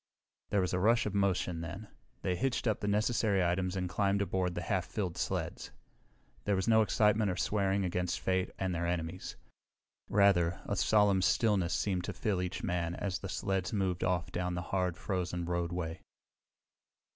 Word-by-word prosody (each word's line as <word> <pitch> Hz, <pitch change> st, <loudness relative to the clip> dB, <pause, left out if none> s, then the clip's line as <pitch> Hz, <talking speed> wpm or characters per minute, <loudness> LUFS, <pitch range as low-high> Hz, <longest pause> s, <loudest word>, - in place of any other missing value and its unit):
There 100 Hz, -, +2 dB
was 90 Hz, -, -1 dB
a 90 Hz, -, +1 dB
rush 115 Hz, +5 st, +3 dB
of 105 Hz, -, -2 dB
motion 95 Hz, -4 st, +1 dB
then. 90 Hz, +6 st, -6 dB, 0.4 s
They 90 Hz, -, +1 dB
hitched 125 Hz, +8 st, -1 dB
up 110 Hz, -3 st, +1 dB
the 105 Hz, -, -3 dB
necessary 105 Hz, -4 st, +2 dB
teams 90 Hz, 0 st, -2 dB
and 90 Hz, -1 st, -1 dB
climbed 100 Hz, +2 st, +1 dB
aboard 90 Hz, -2 st, -1 dB
the 85 Hz, -, -3 dB
half 95 Hz, -1 st, 0 dB
filled 95 Hz, -6 st, -3 dB
sleds. -, -, -3 dB, 0.8 s
There 105 Hz, -, +2 dB
was 95 Hz, -1 st, -1 dB
no 110 Hz, -1 st, +6 dB
excitement 105 Hz, 0 st, +3 dB
or 90 Hz, -, -2 dB
swearing 100 Hz, +1 st, +1 dB
against 90 Hz, 0 st, -1 dB
fate 95 Hz, 0 st, 0 dB
and 95 Hz, -1 st, -1 dB
their 85 Hz, 0 st, -1 dB
enemies. 85 Hz, +1 st, -3 dB, 0.7 s
Rather, 90 Hz, -4 st, +3 dB
a -, -, -1 dB
solemn 105 Hz, -3 st, +4 dB
stillness 95 Hz, -4 st, +2 dB
seemed 95 Hz, -3 st, 0 dB
to -, -, -4 dB
fill 105 Hz, -8 st, -1 dB
each 90 Hz, -1 st, -4 dB
man 85 Hz, -1 st, -1 dB
as 95 Hz, -2 st, -2 dB
the 95 Hz, -, -6 dB
sleds 95 Hz, +1 st, -1 dB
moved 95 Hz, -4 st, 0 dB
off 90 Hz, -2 st, 0 dB
down 90 Hz, 0 st, -2 dB
the 90 Hz, -, -3 dB
hard, 90 Hz, -2 st, +1 dB
frozen 90 Hz, -2 st, -2 dB
roadway. 85 Hz, -1 st, -2 dB
95 Hz, 175 wpm, -32 LUFS, 90-100 Hz, 0.8 s, no